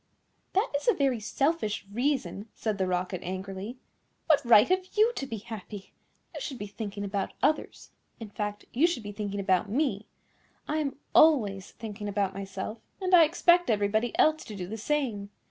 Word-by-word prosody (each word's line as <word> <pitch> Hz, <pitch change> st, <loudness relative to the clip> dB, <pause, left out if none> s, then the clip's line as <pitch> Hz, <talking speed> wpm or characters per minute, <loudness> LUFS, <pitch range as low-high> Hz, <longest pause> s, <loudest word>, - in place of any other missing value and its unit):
"That 395 Hz, +6 st, +1 dB
is 285 Hz, -, -2 dB
a 475 Hz, -, +5 dB
very 270 Hz, -4 st, +1 dB
selfish 245 Hz, -1 st, -1 dB
reason," 245 Hz, -4 st, -1 dB
said 215 Hz, -3 st, -2 dB
the 190 Hz, -, +1 dB
Rocket 180 Hz, 0 st, -2 dB
angrily. 190 Hz, +5 st, -5 dB, 0.5 s
"What 295 Hz, -3 st, +4 dB
right 235 Hz, -2 st, +7 dB
have 370 Hz, 0 st, +1 dB
you 445 Hz, +3 st, +5 dB
to 275 Hz, -, -4 dB
be 230 Hz, -, -4 dB
happy? 205 Hz, -1 st, -9 dB, 0.4 s
You -, -, -6 dB
should 265 Hz, -, -5 dB
be 205 Hz, -, -5 dB
thinking 205 Hz, -1 st, -6 dB
about 200 Hz, -1 st, -2 dB
others. 310 Hz, -, 0 dB, 0.3 s
In 220 Hz, -3 st, -8 dB
fact, 205 Hz, 0 st, -4 dB
you 285 Hz, +8 st, +4 dB
should 340 Hz, -10 st, -3 dB
be 205 Hz, -, -6 dB
thinking 205 Hz, -1 st, -4 dB
about 190 Hz, 0 st, +1 dB
me. 225 Hz, -4 st, 0 dB, 0.6 s
I 305 Hz, -, -1 dB
am 290 Hz, -3 st, -2 dB, 0.2 s
always 210 Hz, -12 st, +4 dB
thinking 210 Hz, -2 st, -7 dB
about 200 Hz, -1 st, 0 dB
myself, 195 Hz, +3 st, -5 dB, 0.2 s
and 375 Hz, -1 st, -1 dB
I 335 Hz, -2 st, +9 dB
expect 345 Hz, +1 st, +3 dB
everybody 215 Hz, +2 st, +1 dB
else 310 Hz, 0 st, +4 dB
to 215 Hz, -, -8 dB
do 185 Hz, -2 st, -4 dB
the 205 Hz, +5 st, -6 dB
same. 225 Hz, -4 st, -1 dB
215 Hz, 180 wpm, -28 LUFS, 200-285 Hz, 0.6 s, I